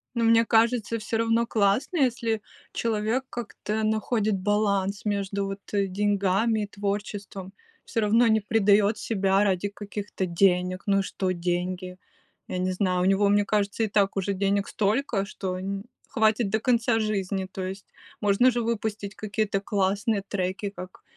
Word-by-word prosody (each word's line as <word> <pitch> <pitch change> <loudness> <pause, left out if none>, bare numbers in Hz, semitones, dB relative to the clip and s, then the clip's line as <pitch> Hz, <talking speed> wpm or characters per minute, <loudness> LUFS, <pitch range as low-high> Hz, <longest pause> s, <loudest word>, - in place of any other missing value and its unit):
Но 235 - +1
мне 230 0 +5
кажется, 230 0 +2
всё 225 +1 -3
равно 230 +1 +2
классно, 215 - +1
если 235 -5 +1 0.3
человек 225 +3 -1
как-то 220 -2 -4
находит 215 0 +1
баланс 200 0 0
между 200 -1 -1
вот 195 0 -5
деньгами 200 +2 +1
и - - -4
творчеством. 200 -1 -4 0.3
Всё 230 - -3
равно 225 +3 +4
не 220 -1 +4
предает 210 0 +3
себя 195 -2 +1
ради 195 -1 +1
каких-то 205 -1 -5
денег. 180 +1 +1
Ну 195 -1 +3
и - - +2
что- 190 -1 -2
деньги, 180 +1 -3 0.5
я - - -4
не 185 +1 0
знаю. 185 -1 0
У - - +2
него, 195 +1 +3
мне 205 0 +4
кажется, 205 +1 0
и - - +1
так 200 -1 +1
уже 195 +1 0
денег 200 +1 0
столько, 210 0 0
что 190 -2 -4
нь 195 +1 -4 0.2
хватит 220 -1 +2
до 220 +2 +1
конца 235 -1 +2
жизни. 195 -3 -1
То 190 - -5
есть 195 +1 -7 0.4
можно 210 +5 +4
же 240 0 -1
выпустить 220 -3 -3
какие-то 210 -1 -1
классные 200 +1 0
треки, 190 +1 -2
как 185 -2 -10
205 Hz, 155 wpm, -26 LUFS, 195-220 Hz, 0.5 s, мне